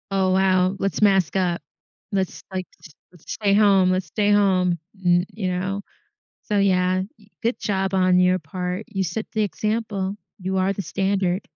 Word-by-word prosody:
Oh, 190 -1 +2
wow. 185 0 +3
Let's 195 +2 -2
mask 195 -3 +3
up. 175 -3 0 0.5
Let's, 190 -3 -2
like, 185 -1 -3 0.2
s 160 - -12 0.2
let's 175 - -12
stay 200 -2 +1
home. 200 -3 +5
Let's 185 0 -1
stay 205 -1 0
home. 185 -4 +3 0.3
N 175 0 +4
you 205 -4 -3
know? 185 +2 -2 0.6
So, 210 - -1
yeah, 185 -2 +2 0.2
eh 210 - -20 0.2
good 235 +2 0
job 195 -1 -1
on 185 -1 +4
your 180 0 +3
part. 180 +5 -4
You 195 -4 -2
set 185 +5 -3
the 215 - +1
example. 210 -1 -2 0.2
You 190 +1 -2
are 190 +1 +2
the 200 - -4
standard. 190 +1 0
190 Hz, 170 wpm, -23 LUFS, 185-200 Hz, 0.6 s, home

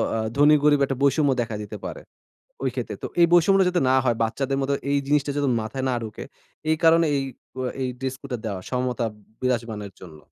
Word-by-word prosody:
আ - - 0 0.2
ধনী 145 +2 +6
গরিব 145 -1 +5
একটা 135 -1 -3
বৈষম্য 140 0 +3
দেখা 115 -2 -3
দিতে 105 +1 -7
পারে। - - -6 0.6
ওই 135 - +2
ক্ষেত্রে। 115 -5 -4
তো - - -1
এই - - +9
বৈষম্যটা 190 +2 +5
যাতে 180 -1 0
না 130 - +4
হয় 120 -3 +2
বাচ্চাদের 135 +4 -1
মতো 135 +1 0 0.2
এই 140 - +3
জিনিসটা 145 -1 +2
যাতে 145 -2 +1
মাথায় 130 +5 -4
না - - +1
ঢুকে 110 -1 -7 0.5
এই 160 - +4
কারণে, 165 0 +6
এই - - 0 0.3
ক - - -15 0.2
এই 130 - 0
ড্রেস 130 0 -3
কোডটা 135 -3 -4
দেওয়া 100 -4 -3
সমতা 125 -1 -1 0.4
বিরাজমানর 115 -5 -2
জন্য। 80 -4 -11
135 Hz, 205 wpm, -24 LUFS, 115-145 Hz, 0.6 s, এই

